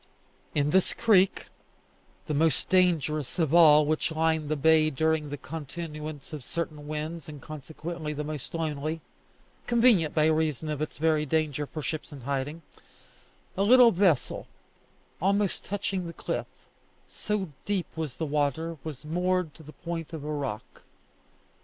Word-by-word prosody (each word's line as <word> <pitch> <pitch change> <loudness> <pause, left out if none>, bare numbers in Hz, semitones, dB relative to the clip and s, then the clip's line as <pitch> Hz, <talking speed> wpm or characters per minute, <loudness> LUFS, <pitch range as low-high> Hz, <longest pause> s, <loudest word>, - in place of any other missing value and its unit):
In 145 0 +2
this 190 +1 +3
creek, 195 -4 +3 0.8
the 155 - -2
most 155 -1 +1
dangerous 160 -6 +2
of 160 -4 +1
all 155 -3 +8
which 155 +2 0
line 160 -1 +1
the 155 - 0
bay 155 +1 +4
during 160 +1 0
the 145 - -4
continuance 150 +2 -7
of 150 -4 -6
certain 155 -1 -5
winds, 155 +1 -4
and 150 -1 -8
consequently 155 +2 -6
the 150 0 -3
most 150 -1 -6
lonely 155 0 -2 0.7
convenient, 230 -10 +4
by 155 -1 +4
reason 155 -1 +1
of 150 -1 -3
its 155 - -3
very 155 0 +2
danger, 150 -1 0
for 155 +1 -6
ships 155 +2 -4
in 140 -2 -9
hiding 140 +5 -3 0.9
a 195 - -1
little 240 +3 +7
vessel, 180 - +1 0.7
almost 200 +1 +1
touching 195 -2 -2
the 170 - -7
cliff, - - -3 0.6
so 210 -4 -3 0.2
deep 200 -4 0
was 155 -6 -4
the 160 - -1
water, 150 +2 -1
was 155 -2 -7
moored 180 0 0
to 160 - -15
a - - -8
point 165 0 -6
of 155 -3 -5
rock. 145 -8 -4
155 Hz, 145 wpm, -28 LUFS, 150-170 Hz, 0.9 s, all